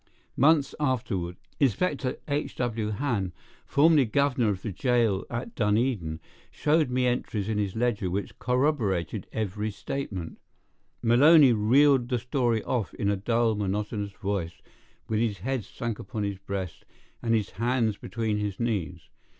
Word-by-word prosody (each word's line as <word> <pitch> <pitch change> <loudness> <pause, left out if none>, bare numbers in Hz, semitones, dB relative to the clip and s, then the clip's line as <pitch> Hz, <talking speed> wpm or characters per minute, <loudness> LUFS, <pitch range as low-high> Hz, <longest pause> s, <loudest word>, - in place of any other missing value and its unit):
Months 145 0 +4
afterward, 110 -11 -1 0.2
Inspector 140 - +1
H. 145 0 -2
W. 115 -3 -2
Hann, 105 -5 -1 0.3
formerly 150 -1 +5
governor 135 -1 +1
of 95 -2 -3
the 110 - -3
jail 115 -1 +1
at 120 +1 -5
Dunedin, 105 -7 0 0.3
showed 155 -2 +1
me 125 0 +1
entries 115 -4 -1
in 110 -1 0
his 100 -2 -2
ledger 110 -5 0
which 100 +3 -4
corroborated 115 - 0
every 105 0 -2
statement 100 -6 -5 0.6
Maloney 135 +3 +7
reeled 125 +4 +4
the 125 - +1
story 120 -2 0
off 120 -6 -2
in 100 - 0
a - - +1
dull, 115 +3 +1
monotonous 105 0 -2
voice, 95 -4 -4 0.4
with 110 -1 0
his 110 -3 0
head 125 +5 -2
sunk 115 +1 -5
upon 105 +1 -4
his 100 -2 -3
breast 95 -3 -5 0.4
and 115 -1 +2
his 105 -3 -1
hands 115 -1 0
between 110 -2 -2
his 105 -2 -3
knees. 100 -8 -2
115 Hz, 140 wpm, -27 LUFS, 100-125 Hz, 0.6 s, Maloney